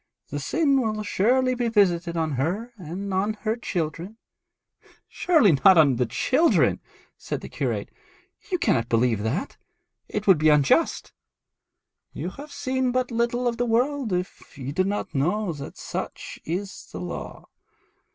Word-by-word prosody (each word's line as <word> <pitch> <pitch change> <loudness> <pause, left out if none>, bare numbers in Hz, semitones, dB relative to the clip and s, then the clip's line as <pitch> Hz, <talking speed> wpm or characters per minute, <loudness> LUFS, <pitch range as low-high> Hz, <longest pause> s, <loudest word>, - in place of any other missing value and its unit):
'The 145 - -3
sin 275 - +2
will 215 -2 -2
surely 255 +6 +2
be 245 -1 -1
visited 175 -6 +2
on 160 -1 0
her 180 - -2
and 190 +3 -5
on 200 +3 +1
her 220 0 0
children.' 180 -2 -4 0.9
'Surely 315 - +3
not 190 -2 +8
on 140 -6 +5
the 125 -1 +1
children,' 260 - +2 0.4
said - - -4
the - - -7
curate. - - -3 0.6
'You 360 - +2
cannot 175 - +1
believe 115 -2 +2
that. 120 - -3 0.5
It 210 0 -3
would 190 -6 +6
be 155 0 +4
unjust.' 150 -2 +2 1.0
'You 165 +5 -4
have 290 +7 -11
seen 260 -2 -1
but 255 0 -1
little 235 +1 0
of 235 -1 -1
the 245 - 0
world 250 +1 +1
if 180 +1 -4
you 135 0 -5
do 185 - +2
not 200 -3 -3
know 175 +7 0
that 140 -2 -9
such - - -6
is 190 +4 -5
the - - -6
law. - - -7
200 Hz, 150 wpm, -25 LUFS, 155-240 Hz, 1.0 s, not